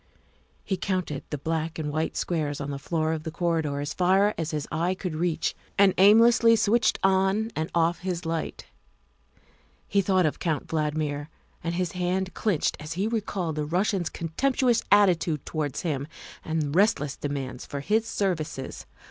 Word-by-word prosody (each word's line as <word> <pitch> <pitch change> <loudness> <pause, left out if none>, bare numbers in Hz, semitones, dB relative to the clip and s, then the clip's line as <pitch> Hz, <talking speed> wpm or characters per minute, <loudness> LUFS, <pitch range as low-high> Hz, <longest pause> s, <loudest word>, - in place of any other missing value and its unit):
He 190 - -2
counted 180 -6 -2
the 150 - -3
black 160 +2 -2
and 150 -2 -3
white 155 +2 -2
squares 150 -4 -1
on 140 0 -4
the 140 - -4
floor 160 +1 -1
of 160 - -3
the 160 - -5
corridor 160 -4 -1
as 145 - -3
far 190 +3 +3
as 165 -2 -3
his 150 -3 -3
eye 170 +4 0
could 180 -4 -4
reach, 170 0 0 0.2
and 200 -2 +6
aimlessly 230 +3 +7
switched 225 +2 +2
on 195 +3 +2
and 160 +1 -2
off 170 +1 +2
his 180 -2 -3
light. 165 0 -3 1.2
He 200 - +2
thought 185 -2 +2
of 150 - -1
Count 160 -4 -1
Valdmir, 150 -2 -2 0.4
and 170 0 -2
his 180 -1 -1
hand 185 +1 -1
clinched 190 -6 0
as 150 +1 -5
he 190 +4 -1
recalled 200 -7 -2
the 150 - 0
Rus 180 +7 +1
sian's 185 -5 -1
contemptuous 245 +8 +1
attitude 175 -7 +3
towards 150 -4 -3
him 145 -4 -2 0.4
and 155 -3 -2
relentless 160 -8 +2
demand 135 -3 -4
for 140 - -5
his 220 +7 +1
services. 165 -11 -3
170 Hz, 165 wpm, -26 LUFS, 155-190 Hz, 1.2 s, aimlessly